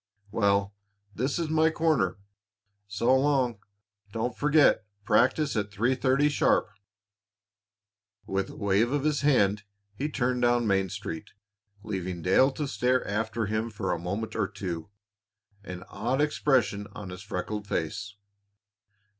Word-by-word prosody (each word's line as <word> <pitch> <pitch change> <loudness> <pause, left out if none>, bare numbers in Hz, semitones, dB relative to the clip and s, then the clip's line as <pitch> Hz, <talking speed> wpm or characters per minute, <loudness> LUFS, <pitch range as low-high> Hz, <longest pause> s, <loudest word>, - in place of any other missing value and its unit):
Well, 100 -1 +2 0.4
this 130 +7 -1
is 165 -2 -2
my 160 0 +4
corner. 155 - +1 0.7
So 115 +6 +2
long. 130 -5 +2 0.5
Don't 115 +3 -2
forget 150 -5 +4 0.2
practice 130 +7 +3
at 105 -1 -1
three 115 +6 +1
thirty 135 +2 +2
sharp." 145 - +2 1.5
With 95 0 -2
a - - -10
wave 100 +3 +1
of 145 -1 0
his 150 -1 +1
hand 105 -8 +3 0.3
he 140 +9 -3
turned 125 -3 0
down 120 -1 +3
Main 95 -2 +1
Street, 95 -4 -6 0.5
leaving 95 -5 -4
Dale 95 - +5
to 150 +1 -3
stare 125 +2 +1
after 110 +2 -1
him 110 +2 -1
for 100 -3 -3
a 85 - -1
moment 100 +6 -4
or - - +1
two, 85 -3 -5 0.7
an 90 -2 -7
odd 130 +4 -2
expression 130 -8 +1
on 95 -3 -7
his 90 0 -8
freckled 100 +2 -4
face. 100 +4 -3
110 Hz, 135 wpm, -28 LUFS, 100-130 Hz, 1.5 s, Dale